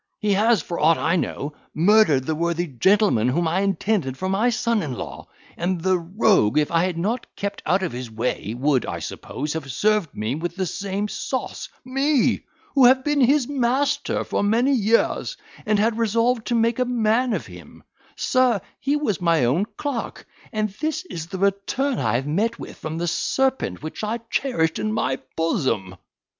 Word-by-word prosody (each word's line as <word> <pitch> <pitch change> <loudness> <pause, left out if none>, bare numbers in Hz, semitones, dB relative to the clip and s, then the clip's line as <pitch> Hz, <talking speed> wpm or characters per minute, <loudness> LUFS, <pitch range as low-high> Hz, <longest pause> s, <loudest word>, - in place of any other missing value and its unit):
he 210 -1 +1
has, 215 -2 +3
for 170 - -4
aught 160 +2 +4
I 165 +2 +1
know, 150 -4 -2 0.2
murdered 170 -5 +4
the 160 - 0
worthy 170 +2 -1
gentleman 165 - +3
whom 165 +6 +1
I 175 +4 +1
intended 195 -8 0
for 185 - -3
my 200 +6 +2
son 230 -1 +1
in 145 -5 -3
law; - - -7 0.3
and 175 +1 -1
the 185 +1 +2
rogue, 170 - +2
if 150 -1 +2
I 170 +1 +3
had 180 -3 -2
not 220 +8 -2
kept 200 0 -4
out 190 +1 +2
of 175 - -1
his 125 0 -6
way, 110 -1 -3
would, 135 -1 +2
I - - -3
suppose, 150 +3 -5
have 150 -4 -5
served 210 +2 +1
me 110 +3 -2
with 170 +3 -4
the 190 -1 -1
same 200 +3 -3
sauce. 260 +4 -4 0.2
Me! 270 +1 +2 0.3
who 270 -3 +6
have 260 +1 +6
been 295 0 +1
his 265 +1 +4
master 270 0 0
for - - -1
many 230 +7 +2
years, 230 - +1 0.3
and 215 0 +3
had 220 +2 +1
resolved 230 +1 +1
to 240 - +1
make 230 +1 +2
a 250 - +2
man 240 0 +1
of 180 - -2
him. 90 -4 -13 0.3
Sir, 255 -4 +2 0.2
he 280 +2 0
was 285 - -1
my 165 -6 +3
own 150 +12 +2
clerk, 280 -6 -4 0.3
and 215 -1 -1
this 315 +3 -1
is 165 -1 -5
the 190 - -6
return 200 +8 0
I 115 -2 +1
have 130 +3 0
met 210 +10 0
with - - -9
from 155 +1 -5
the 175 +1 -2
serpent 265 - 0
which 155 +6 -6
I 215 +2 -1
cherished 165 -13 0
in 215 0 -1
my 220 0 0 0.2
bosom." 115 - -1
200 Hz, 185 wpm, -23 LUFS, 160-235 Hz, 0.3 s, who